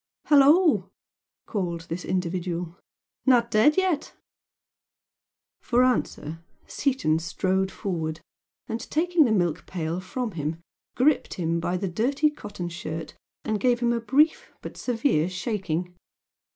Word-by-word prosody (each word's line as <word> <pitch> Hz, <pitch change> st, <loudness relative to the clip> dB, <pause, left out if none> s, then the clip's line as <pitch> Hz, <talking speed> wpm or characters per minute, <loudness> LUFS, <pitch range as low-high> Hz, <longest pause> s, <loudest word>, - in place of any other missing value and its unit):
"Hello 285 Hz, -1 st, +7 dB
o!" 290 Hz, -, +2 dB, 0.6 s
called 175 Hz, -6 st, -3 dB
this 165 Hz, +2 st, -6 dB
individual. 175 Hz, -1 st, -2 dB, 0.5 s
"Not 240 Hz, -2 st, +4 dB
dead 220 Hz, +8 st, +4 dB
yet?" 370 Hz, -6 st, 0 dB, 1.5 s
For 245 Hz, 0 st, +3 dB
answer 165 Hz, -10 st, -1 dB, 0.2 s
Seaton 255 Hz, -, 0 dB
strode 190 Hz, +3 st, 0 dB
forward 165 Hz, -6 st, -3 dB, 0.5 s
and 225 Hz, 0 st, -3 dB
taking 335 Hz, 0 st, +3 dB
the 235 Hz, -, +1 dB
milk 175 Hz, -6 st, 0 dB
pail 170 Hz, -1 st, -3 dB
from 225 Hz, +6 st, -4 dB
him 155 Hz, -2 st, -3 dB, 0.4 s
gripped 285 Hz, +4 st, +2 dB
him 170 Hz, -1 st, -1 dB
by 175 Hz, +2 st, -1 dB
the 195 Hz, +2 st, -2 dB
dirty 270 Hz, -, +1 dB
cotton 205 Hz, -10 st, -7 dB
shirt 165 Hz, -1 st, -6 dB, 0.3 s
and 215 Hz, -1 st, 0 dB
gave 245 Hz, 0 st, +2 dB
him 240 Hz, -1 st, +2 dB
a 235 Hz, -, 0 dB
brief 280 Hz, +8 st, +2 dB
but -, -, -7 dB
severe 225 Hz, -, +1 dB
shaking. 185 Hz, -3 st, -3 dB
195 Hz, 125 wpm, -26 LUFS, 170-255 Hz, 1.5 s, Hello